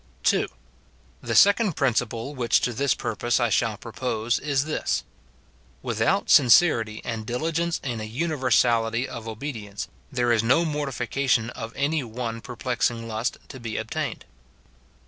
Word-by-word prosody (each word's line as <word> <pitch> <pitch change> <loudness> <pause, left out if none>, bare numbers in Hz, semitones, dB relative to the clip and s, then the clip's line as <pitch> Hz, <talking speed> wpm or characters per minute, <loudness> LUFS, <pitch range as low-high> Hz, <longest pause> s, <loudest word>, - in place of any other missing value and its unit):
2. - - +3 0.7
The - - -2
second 200 -1 +5
principle 125 0 0
which 120 -5 +2
to 125 - 0
this 140 +3 +1
purpose 120 +4 -1
I 120 -2 +2
shall 110 0 +1
propose 115 +1 -2
is 140 -1 0
this: 155 - -1 0.4
— - - -33
WitJiout - - +1
sincerity 115 -5 +5
and 115 -3 -3
diligence 160 +8 -1
in 120 -5 -3
a - - -4
universality 120 -3 +1
of 115 -3 -8
obedience, 110 -3 -6 0.2
there 120 -2 +1
is 115 -2 +3
no 130 +9 +3
mortification 135 -5 0
of 115 -1 -7
any 145 +1 0
one 115 -1 -5
perplexing 120 -1 -2
lust 110 +2 -2
to 130 - -9
be 115 -2 -5
obtained. - - -4
120 Hz, 140 wpm, -25 LUFS, 115-140 Hz, 0.7 s, second